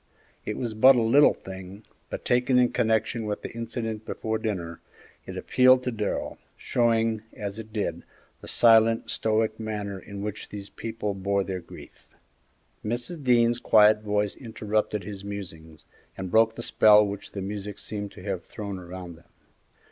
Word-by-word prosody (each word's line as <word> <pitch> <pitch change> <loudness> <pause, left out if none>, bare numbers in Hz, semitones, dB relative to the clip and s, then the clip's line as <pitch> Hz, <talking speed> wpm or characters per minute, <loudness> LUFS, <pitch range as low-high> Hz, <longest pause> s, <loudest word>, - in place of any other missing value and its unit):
It - - -2
was 120 -3 -3
but 130 +5 +7
a 120 - +2
little 135 +6 +5
thing, 95 +2 -10 0.3
but - - -6
taken 125 +1 +3
in 125 -1 +4
connection 110 0 0
with 105 - -3
the - - -5
incident 115 -1 -4
before 110 0 -3
dinner, 90 -7 -4 0.5
it - - -6
appealed 130 0 +4
to 125 - -1
Darrell, 105 -3 -3 0.2
showing, 115 -2 +1
as 100 +1 -6
it 110 -1 -9
did, 100 -6 -2 0.4
the - - -11
silent, 115 -1 +4
stoical 110 0 0
manner 105 -3 -4
in 100 +1 -8
which 105 0 -5
these 100 -1 -8
people 110 -2 -4
bore 100 +1 0
their 95 -1 -4
grief. 85 - -14 0.7
Mrs. 120 +8 -4
Dean's 120 -2 +3
quiet 105 -2 +5
voice 105 -1 -1
interrupted 110 -3 -2
his 100 0 -8
musings 80 -6 -8 0.3
and 95 -1 -5
broke 110 0 +4
the 115 - -6
spell 105 -2 +6
which 100 0 -6
the 100 - -4
music 100 0 -5
seemed 105 -2 -5
to 90 - -12
have 95 -4 -3
thrown 100 -1 -6
around 90 -1 -9
them. 85 - -23
105 Hz, 165 wpm, -26 LUFS, 100-115 Hz, 0.7 s, but